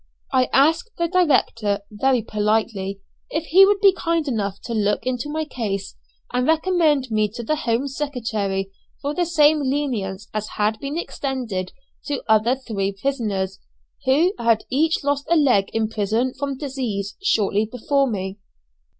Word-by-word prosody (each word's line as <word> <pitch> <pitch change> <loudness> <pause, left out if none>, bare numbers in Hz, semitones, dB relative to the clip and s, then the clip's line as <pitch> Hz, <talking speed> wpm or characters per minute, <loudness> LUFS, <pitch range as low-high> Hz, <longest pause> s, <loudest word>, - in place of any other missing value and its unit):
I 255 -1 +3
asked 320 - +3
the 340 -1 +1
director, 255 - +2
very 245 +3 +1
politely, 210 -2 -1 0.3
if 315 +1 -2
he 380 +4 +6
would 405 0 +2
be 395 -2 +7
kind 335 -4 -1
enough 200 -6 -2
to 235 - -4
look 210 0 0
into 255 +2 -2
my 310 +1 -2
case, 205 -8 -4 0.4
and 250 +1 +1
recommend 320 -5 +2
me 215 -1 +2
to 240 - -5
the 305 +7 0
Home 250 -2 0
Secretary 220 -9 -2 0.3
for 285 +1 -3
the 350 +1 0
same 310 -2 +4
leniency 245 -9 -2
as 215 0 -2
had 215 +1 +1
been 280 +3 -4
extended 245 - -3 0.4
to 285 -3 -2
other 220 +3 +4
three 200 -7 -3
prisoners, 200 -8 -2 0.5
who 315 +9 +3
had 230 -2 +2
each 315 +5 +1
lost 285 0 -1
a 340 - +4
leg 255 -11 +3
in 225 -1 0
prison 220 +4 0
from 280 -2 -4
disease, 250 -8 -3
shortly 215 - +2
before 275 +2 +1
me. 190 -1 -4
250 Hz, 155 wpm, -22 LUFS, 210-290 Hz, 0.5 s, be